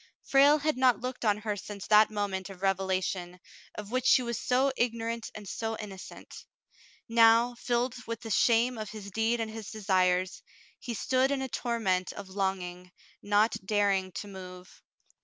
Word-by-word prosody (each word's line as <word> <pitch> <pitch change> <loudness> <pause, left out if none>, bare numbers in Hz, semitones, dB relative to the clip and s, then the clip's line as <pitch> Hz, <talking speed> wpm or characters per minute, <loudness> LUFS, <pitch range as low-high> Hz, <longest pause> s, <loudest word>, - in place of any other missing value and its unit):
Frale 280 +2 +5
had 305 -1 -1
not 255 -2 +4
looked 250 0 -5
on 210 -2 +2
her 210 -1 -3
since 200 0 -8
that 215 0 +6
moment 200 -3 -3
of 195 -1 -11
revelation, 185 -2 -1 0.4
of 210 0 -8
which 255 0 0
she 255 - +5
was 235 -1 -3
so 260 +2 +2
igno 235 -1 0
rant 230 0 -4
and 210 -1 -9
so 225 +3 -3
innocent. 195 -3 -10 0.6
Now, 230 +1 +5
filled 240 +1 -1
with 230 0 -5
the 225 - -7
shame 235 +3 +3
of 215 -2 -5
his 205 -2 -9
deed 225 +3 0
and 225 -1 -3
his 220 -2 -7
desires, 185 -3 +1 0.4
he 240 -3 -5
stood 260 +5 +1
in 275 -1 -1
a - - -3
torment 225 -6 -1
of 200 -2 -9
longing, 185 -2 -3 0.3
not 205 +2 +2
daring 195 -2 +1
to 205 - -6
move. 185 -2 -11
215 Hz, 170 wpm, -29 LUFS, 190-235 Hz, 0.6 s, that